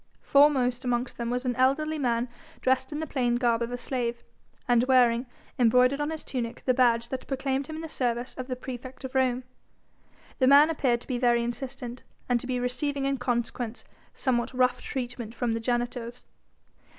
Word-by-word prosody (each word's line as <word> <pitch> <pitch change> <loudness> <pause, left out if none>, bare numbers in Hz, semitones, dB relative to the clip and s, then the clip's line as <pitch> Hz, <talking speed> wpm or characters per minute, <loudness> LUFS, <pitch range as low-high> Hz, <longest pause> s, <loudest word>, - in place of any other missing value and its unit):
Foremost 265 -3 +4
amongst 245 0 -1
them 235 0 -2
was 250 +2 -2
an 245 -1 0
elderly 300 +4 +2
man 240 -2 +1 0.3
dressed 260 +1 +1
in 295 - -3
the 315 - -2
plain 245 -5 0
garb 240 -1 +2
of 235 +1 -2
a 245 - -3
slave, 240 -2 -2 0.4
and 240 -1 +4
wearing, 250 -1 +4 0.3
embroidered 250 +4 +4
on 295 - -1
his 315 -1 -5
tunic, 235 -3 -4
the 255 - +4
badge 235 -2 +3
that 260 - -5
proclaimed 270 0 -1
him 315 - -6
in 320 - -6
the - - -4
service 245 -4 -2
of 255 -1 -6
the 255 - -2
praefect 255 +1 -8
of 260 - -6
Rome. 260 -1 +1 1.0
The 260 - +4
man 290 +4 +7
appeared 250 -6 +1
to - - -13
be 250 -2 -2
very 240 -1 +3
insistent, 250 0 -5 0.3
and 245 -1 +2
to 250 - -8
be 250 -1 -1
receiving 275 +3 -1
in 275 -1 0
consequence, 240 -1 -2 0.3
somewhat 250 -1 -1
rough 250 0 +2
treatment 240 -3 -5
from 240 -1 -1
the 225 - -1
janitors. 240 0 -2
250 Hz, 185 wpm, -27 LUFS, 240-265 Hz, 1.0 s, man